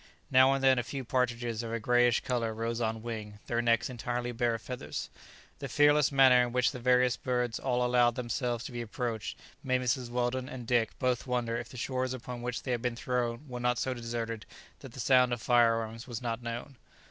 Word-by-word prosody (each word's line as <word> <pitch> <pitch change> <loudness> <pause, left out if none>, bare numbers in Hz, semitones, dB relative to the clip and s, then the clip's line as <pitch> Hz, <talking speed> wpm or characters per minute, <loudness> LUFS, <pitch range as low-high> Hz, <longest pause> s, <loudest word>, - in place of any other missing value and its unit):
Now 130 0 +6
and 135 0 -1
then 130 -1 +5
a - - -1
few 135 +3 -5
partridges 120 -2 -1
of 115 -1 -5
a 115 - -2
greyish 120 +1 +3
colour 115 -3 -1
rose 115 +1 -2
on 110 -1 -2
wing, 110 -3 -6
their 120 0 0
necks 115 -1 +2
entirely 120 0 -3
bare 120 0 0
of 115 - -7
feathers: 125 -1 -5 0.5
the 140 - -4
fearless 145 +2 +4
manner 130 -2 +6
in 120 -1 0
which 125 +1 +2
the 130 - -7
various 125 0 +3
birds 125 -3 -1
all 125 -2 0
allowed 120 -1 +3
themselves 120 -1 -2
to - - -7
be 120 -1 -4
approached 115 -1 -4 0.3
made 130 -1 +1
Mrs. 125 0 -1
Weldon 125 +1 -1
and 125 -2 -7
Dick 115 -2 +1
both 125 0 0
wonder 120 -2 -1
if 120 0 -5
the 125 - -11
shores 130 +1 -2
upon 125 0 -7
which 125 0 -4
they 130 - -3
had 120 -2 -1
been 125 -1 -1
thrown 125 +2 -2
were 125 -2 -6
not 125 0 +1
so 130 - -1
deserted 115 -2 -4 0.3
that 135 -4 -11
the 130 - -9
sound 125 0 +4
of 120 - -2
fire 120 -2 +4
arms 115 +1 -5
was 120 -3 -5
not 120 -1 -3
known. 120 +3 -6
120 Hz, 220 wpm, -30 LUFS, 115-125 Hz, 0.5 s, Now